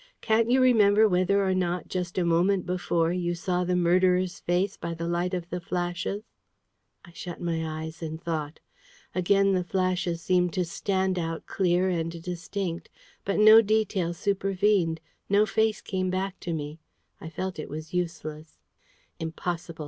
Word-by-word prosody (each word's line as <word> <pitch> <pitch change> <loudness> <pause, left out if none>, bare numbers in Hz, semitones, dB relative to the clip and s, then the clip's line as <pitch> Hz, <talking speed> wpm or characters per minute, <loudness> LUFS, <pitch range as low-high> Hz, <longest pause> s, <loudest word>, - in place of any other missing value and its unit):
Can't 225 +1 +2
you 260 +2 +4
remember 220 -4 +5
whether 195 +1 +2
or 190 - +2
not, 180 -1 -1
just 180 -1 -4
a 180 - +2
moment 175 +3 +2
before, 175 -2 0
you 175 -1 -1
saw 180 +1 -1
the 180 0 0
murderer's 180 +1 +2
face 180 +3 0
by 170 0 -5
the 170 +1 -4
light 175 +2 0
of 175 -1 -4
the 180 0 -3
flashes?" 175 +4 -3 0.8
I 175 - -15
shut 175 +1 -7
my 160 -2 -3
eyes 160 +2 -8
and 160 -1 -5
thought. 160 -3 -4 0.5
Again 195 +2 +3
the 185 -1 +1
flashes 180 -2 -1
seemed 180 0 +1
to 180 - 0
stand 190 +1 -1
out 165 -1 -4
clear 180 -1 +1
and 165 -2 -2
distinct. 180 0 -4 0.4
But 200 - 0
no 215 +1 +9
detail 205 -5 0
supervened 195 -3 +1 0.3
no 205 +2 +4
face 220 +1 +1
came 185 -1 -2
back 190 +1 -2
to 175 - -5
me. 150 0 -4 0.4
I 160 - -8
felt 185 +1 -4
it - - -6
was 155 +3 -7
useless. 160 -3 -4 0.6
"Impossible!" 165 0 -4
180 Hz, 160 wpm, -27 LUFS, 170-190 Hz, 0.8 s, no